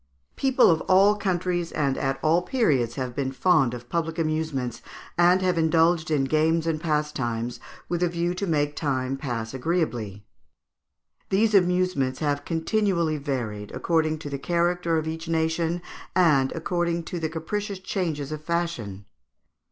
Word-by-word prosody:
People 265 -6 +4
of 160 -1 +1
all 195 +2 +6
countries 180 -3 -1
and 140 -3 0
at 135 0 -1
all 160 +3 +4
periods 150 - +1
have 130 -3 -4
been 135 -2 -1
fond 135 -4 +2
of 120 0 -10
public 165 +2 -2
amusements, 155 -6 -2 0.3
and 180 +2 +4
have 180 -2 +1
indulged 160 0 +3
in 150 -3 +2
games 160 +4 +2
and 160 -2 -1
pastimes 130 -7 -2 0.3
with 175 0 -2
a 180 - +3
view 170 +1 -1
to 195 +2 -3
make 145 -3 0
time 135 -3 -1
pass 120 -5 -4
agreeably. 125 - -2 1.0
These 215 +3 +2
amusements 180 -8 +2
have 145 -2 -1
continually 170 -2 0
varied, 120 -8 -4
according 160 -2 +1
to - - -3
the 140 - -3
character 170 +1 +1
of 160 0 -2
each 160 +1 -5
nation, 165 +1 0 0.3
and 150 -8 +4
according 170 0 -1
to 175 - -5
the 160 -1 -2
capricious 200 +6 -4
changes 165 -7 -3
of 155 0 -5
fashion. 165 - -3
160 Hz, 150 wpm, -25 LUFS, 135-175 Hz, 1.0 s, all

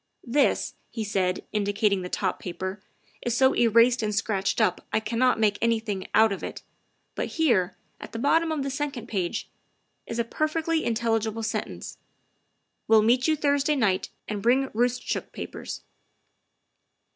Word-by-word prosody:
" - - -51
This," 275 +4 +1 0.2
he 225 - -4
said, 190 -3 -1
indicating 205 -1 +1
the 180 - -5
top - - -1
paper, 185 +2 -5 0.4
"is 240 -1 -1
so 265 0 +5
erased 235 +2 +4
and 210 -1 -1
scratched 200 -1 0
up 180 - +2
I - - +2
cannot 230 +3 +1
make 210 -2 +2
anything 220 -4 0
out 220 0 +6
of 195 - -4
it, - - -6 0.5
but - - -2
here, 220 - +2 0.2
at - - -9
the - - -5
bottom 320 +6 +2
of 300 -3 -1
the 275 - -2
second 275 -3 -3
page, 185 -5 -2 0.6
is 230 - -4
a 235 - +2
per 310 +7 -1
fectly 325 +1 0
intelligible 225 -1 0
sentence. - - -4 0.4
' - - -49
Will 220 -1 +6
meet 245 +5 +3
you 315 - +3
Thursday 285 0 +2
night 205 -8 +1 0.2
and 210 -2 -3
bring 260 +4 +3
Roostchook 245 +2 -1
papers. - - -7
230 Hz, 160 wpm, -26 LUFS, 205-265 Hz, 0.6 s, out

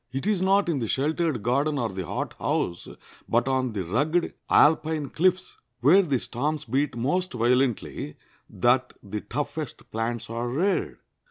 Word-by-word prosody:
It 135 +1 -3
is 205 -3 +1
not 195 +1 +3
in 160 -5 0
the 115 - -2
sheltered 150 -1 0
garden 140 +5 +1
or 120 -4 0
the 95 -3 -5
hothouse, 85 -1 -2 0.4
but 120 +2 +2
on 130 -3 0
the 95 -4 -3
rugged 150 - 0 0.2
Alpine 155 -1 +3
cliffs, 185 +2 +1 0.2
where 160 +10 +6
the 145 -8 0
storms 150 +6 -2
beat 135 +2 0
most 180 +9 0
violently, 120 - 0 0.3
that 125 +1 +2
the 105 +1 -5
toughest 145 +1 -5
plants 115 +1 -2
are 115 +1 -3
reared. 180 +10 0
135 Hz, 150 wpm, -26 LUFS, 120-155 Hz, 0.4 s, where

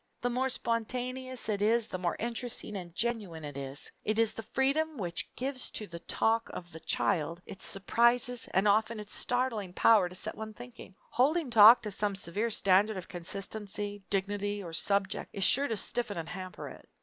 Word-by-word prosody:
The 245 - -1
more 260 +2 0
spontaneous 250 +2 -3
it 205 -2 -1
is 225 +2 +3
the 185 - -5
more 175 -1 -1
interesting 235 -2 -1
and 175 -3 -7
genuine 210 -9 -2
it 145 -2 -7
is. 140 0 -7
It 215 +1 0
is 225 -1 +3
this 225 - -8
freedom 300 +4 +1
which 175 -4 -3
gives 260 0 -1
to 215 - -3
the 170 -3 -8
talk 225 +6 0
of 175 -1 -8
the 160 - -9
child 165 0 0
its 190 - -6
surprises 235 +5 +2
and 190 +3 +3
often 220 +2 +2
its 210 -1 -5
startling 235 -7 -1
power 205 -3 +5
to 180 - -10
set 215 +4 -4
one 220 0 -7
thinking. 245 -5 -11 0.2
Holding 290 +2 +2
talk 225 +2 +9
to 210 - -3
some 205 0 -1
severe 200 +5 -2
standard 200 0 +3
of 180 - -7
consistency, 205 +3 -4
dignity, 205 +1 -1
or 170 -2 -8
subject 200 +3 0
is 195 - -2
sure 280 +9 +4
to 225 - -2
stiffen 225 -1 -1
and 165 -1 -4
hamper 185 0 -6
it. - - -12
210 Hz, 185 wpm, -31 LUFS, 190-235 Hz, 0.2 s, talk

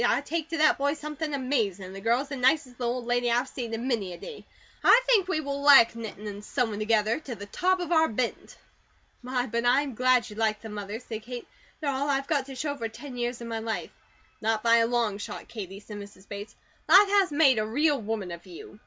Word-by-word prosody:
I - - +2
take 320 +2 -3
to 330 - -2
that 310 -2 +4
boy 285 +2 +1
something 300 0 -5
amazin', 230 -9 -1
and 185 - -9
the 195 - -8
girl 235 +4 +2
is 280 - -8
the 280 - -4
nicest 260 -1 +1
little 240 0 0
old 250 -2 -5
lady 245 0 +1
I've 240 +3 +1
seen 240 -3 -6
in 230 +3 -3
many 210 -8 -1
a - - -9
day. 455 - -10 0.4
I - - +8
think 440 -7 +4
we 315 -5 0
will 280 -1 -4
like 280 -5 +7
knittin' 220 -2 -8
and 205 0 -6
sewin' 225 -3 -1
together, 215 +2 +1
to 270 -6 -7
the 205 - -8
top 370 - +1
of 350 -2 -4
our 320 -1 +5
bent." 235 +2 -3 0.6
"My, 250 0 -1
but 235 -1 -2
I'm 265 +3 +2
glad 255 0 +3
you 210 - -10
like 215 -1 0
them, 220 -2 -8
Mother," 205 +1 -5
said 225 -3 -7
Kate. 245 +2 -8 0.3
"They 300 - -3
are 280 - +1
all 280 +2 -1
I've 275 -1 +1
got 280 -3 0
to 270 - -8
show 285 +2 -2
for 230 -3 -3
ten 260 +4 -10
years 240 0 -3
of 235 - -6
my 225 -1 -3
life." 220 0 -4 0.5
"Not 220 0 0
by 230 0 +5
a 230 0 +3
long 230 -4 0
shot, - - -7
Katie," 195 -4 -7
said 210 0 -9
Mrs. 200 -1 -12
Bates. 205 +1 -8 0.3
"Life 400 +2 +8
has 395 -4 +3
made 285 -5 +4
a 215 - 0
real 290 +4 +1
woman 210 -4 -3
of 170 +2 -9
you. 180 +3 -11
245 Hz, 245 wpm, -27 LUFS, 220-285 Hz, 0.6 s, I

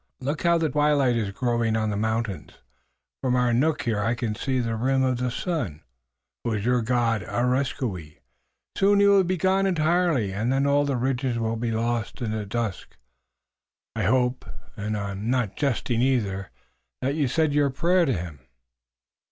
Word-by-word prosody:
Look 145 +3 -3
how 170 -1 +3
the 165 -1 +1
twilight 145 -4 +2
is 110 -4 -1
growing 120 +1 0
on 110 -1 0
the - - -2
mountains. 110 -4 -2 0.7
From 125 -2 +1
our 125 -1 +2
nook 150 +6 +1
here 110 -3 0
I 115 +4 0
can 115 -2 -2
just - - -8
see 130 -1 +1
the 115 -2 -1
rim 130 +3 +1
of 130 -1 +1
the 125 0 0
sun, 120 - -3 0.6
who 115 - -1
is 105 -1 -2
your 125 0 +2
God, 115 -2 +1
Areskoui. 120 - -2 0.6
Soon 200 +1 +4
he 200 - +5
will 200 -1 +6
be 185 +1 -1
gone 190 +3 +2
entirely 165 - +1
and 110 +5 -1
then 135 +1 +2
all 145 +1 +3
the 140 -3 -1
ridges 125 -1 -1
will 115 0 -1
be 115 +1 -2
lost 115 0 -2
in 115 -4 -2
the 110 -1 -3
dusk. 110 -2 -4 1.0
I - - -1
hope 125 +3 +1 0.3
and 105 +1 -3
I'm 100 +2 -4
not 120 -6 0
jesting 125 -4 0
either 105 -7 0 0.5
that 135 +2 +1
you've 145 -4 0
said 155 +2 +1
your 145 -1 +3
prayer 170 +6 +2
to 135 - +1
him." 85 -6 -5
125 Hz, 180 wpm, -25 LUFS, 110-140 Hz, 1.0 s, will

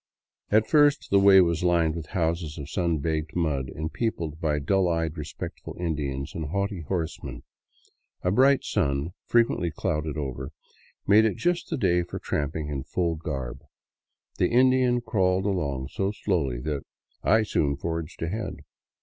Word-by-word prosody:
At 110 +1 +3
first 145 -1 +4
the 100 - +6
way 100 -1 +8
was 85 -2 +1
lined 85 -3 +3
with 80 -2 -6
houses 80 -2 -1
of 70 0 -7
sun 85 -3 +1
baked 80 0 -2
mud, 75 -6 0
and 80 +1 -5
peopled 85 -9 -2
by 75 -2 +1
dull 95 +6 +2
eyed, 80 -2 0
respectful 75 -3 -7
Indians 70 -5 -3
and 80 - -4
haughty 100 +3 -2
horsemen. 80 0 -4 0.8
A 90 - +2
bright 135 +6 +4
sun, 70 +4 0 0.2
frequently 115 -7 +2
clouded 75 -2 -2
over, 65 0 -4 0.5
made 105 +2 +6
it 110 - +1
just 175 0 0
the 165 - -1
day 90 -6 +2
for 85 - -6
tramping 75 +1 -2
in 70 -3 -3
full 85 +2 -1
garb. 70 -6 -5 0.8
The 90 - +3
Indian 125 0 +4
crawled 95 -5 +1
along 70 -9 -1
so 95 +1 -1
slowly 80 - -1
that 75 -1 -3 0.4
I 110 +1 +4
soon 70 -8 0
forged 80 +1 -4
ahead. 105 +7 -3
85 Hz, 155 wpm, -26 LUFS, 75-100 Hz, 0.8 s, way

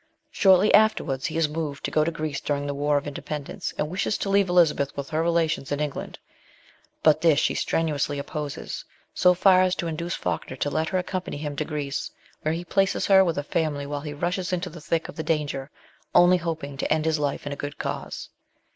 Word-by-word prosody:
Shortly 190 +1 +5
afterwards, 200 -11 +3
he 160 - -4
is 165 -2 +3
moved 150 -2 -4
to - - -2
go 155 - +3
to 160 - +1
Greece 155 -3 -4
during 145 -1 -1
the 145 - -2
War 145 +1 +1
of 145 - -2
Independence, 145 0 -5
and 150 - 0
wishes 185 +5 -1
to 200 - -3
leave 200 -1 +3
Elizabeth 160 -6 +3
with 140 +2 -5
her 155 +1 +1
relations 165 -4 0
in 145 - 0
England; 150 -2 -4 0.9
but 155 -2 +5
this 160 -4 +5
she - - +1
strenuously 150 -3 0
opposes 145 0 -5 0.3
so 180 0 +4
far 185 0 +5
as 185 0 +2
to 170 - -3
induce 170 +1 -3
Falkner - - -3
to 145 +2 -2
let 160 +1 0
her 185 - 0
accompany 185 -3 -3
him 145 -1 -4
to 155 - -2
Greece, 145 -2 -3 0.3
where 155 +1 0
he 175 +1 -5
places 195 +2 +1
her 190 -1 +7
with 170 -3 -1
a 145 - -1
family 150 -2 -1
while 145 0 -4
he 150 0 -6
rushes 175 +5 -2
into 180 0 -2
the 170 0 -10
thick 165 +1 -1
of - - -10
the - - -1
danger, 145 -4 -1 0.5
only 175 +1 +7
hoping 160 -5 -4
to - - -2
end 155 0 +2
his 160 -1 +1
life 145 -1 -2
in 145 - -3
a - - -5
good 145 0 -6
cause. - - -5
155 Hz, 220 wpm, -25 LUFS, 145-175 Hz, 0.9 s, her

